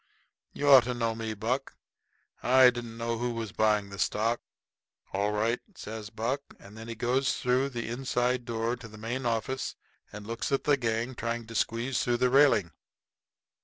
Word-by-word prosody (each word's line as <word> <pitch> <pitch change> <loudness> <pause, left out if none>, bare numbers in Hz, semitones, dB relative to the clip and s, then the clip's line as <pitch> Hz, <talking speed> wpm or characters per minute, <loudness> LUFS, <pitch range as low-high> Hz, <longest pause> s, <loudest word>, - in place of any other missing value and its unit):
"You 145 - -3
ought 135 -4 +9
to 125 0 -2
know 115 -1 0
me, 110 -1 -4
Buck. 125 +6 -2 0.7
I 130 0 +7
didn't 120 -2 -7
know 115 0 -2
who 120 -1 -1
was 115 -3 -4
buying 105 -2 +1
the 100 - -8
stock." 115 +3 +1 0.7
"All 100 +2 +1
right," 110 +3 +1 0.2
says 110 -4 -7
Buck. 115 +6 -2 0.2
And 100 +2 -14
then 110 +1 -9
he 115 - -5
goes 125 +4 +1
through 125 +2 +1
the 120 -4 -4
inside 125 0 0
door 115 0 -1
into 120 -2 -7
the 110 -1 -13
main 120 +4 -3
office 120 +3 -2 0.4
and 105 0 -9
looks 115 +4 -3
at 135 - +1
the 145 - +4
gang 115 -1 -1
trying 115 -1 -3
to 115 - -10
squeeze 115 +3 0
through 120 -1 +1
the 125 0 +2
railing. 135 - +5
115 Hz, 180 wpm, -29 LUFS, 110-125 Hz, 0.7 s, ought